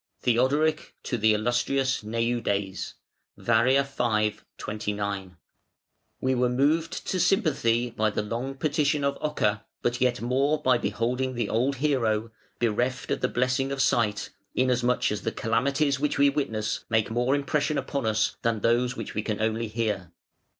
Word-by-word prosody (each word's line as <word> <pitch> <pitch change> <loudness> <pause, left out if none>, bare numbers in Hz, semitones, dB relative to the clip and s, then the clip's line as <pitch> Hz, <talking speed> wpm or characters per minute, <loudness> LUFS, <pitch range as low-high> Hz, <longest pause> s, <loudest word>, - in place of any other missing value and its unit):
"THEODORIC 145 +6 +1
to 125 - -2
the 110 0 +4
Illustrious 125 +4 0
Neudes. 110 -3 -2 0.4
(Var., 125 +4 +3
v., 115 -6 0 0.2
29.) 100 -3 -4 0.8
"We 130 0 +1
were 125 -1 +2
moved 150 +6 +1
to 185 - -1
sympathy 130 -10 +2
by 110 -1 +1
the 105 - -2
long 120 +5 -4
petition 150 0 +1
of 140 0 0
Ocer 105 -9 0 0.2
but 120 +1 0
yet 125 -1 +2
more 135 +5 +1
by 130 -4 +3
beholding 120 +6 -1
the 120 -3 -1
old 130 +5 +1
hero, 115 -6 0 0.3
bereft 120 +2 -1
of - - -1
the 125 - +2
blessing 125 +2 0
of 140 - -3
sight, 110 -6 +1 0.2
inasmuch 125 -2 +2
as 105 - -2
the - - -2
calamities 140 +5 +1
which 150 0 0
we 140 0 +5
witness 110 -7 -2
make 110 -1 +1
more 125 +4 +2
impression 150 +1 0
upon 135 -2 -2
us 110 0 +1
than 115 -2 0
those 120 +3 +2
of - - -14
which 115 - -5
we 105 - -2 0.2
only 110 +1 0
hear. 105 -5 -2
120 Hz, 150 wpm, -26 LUFS, 110-140 Hz, 0.8 s, we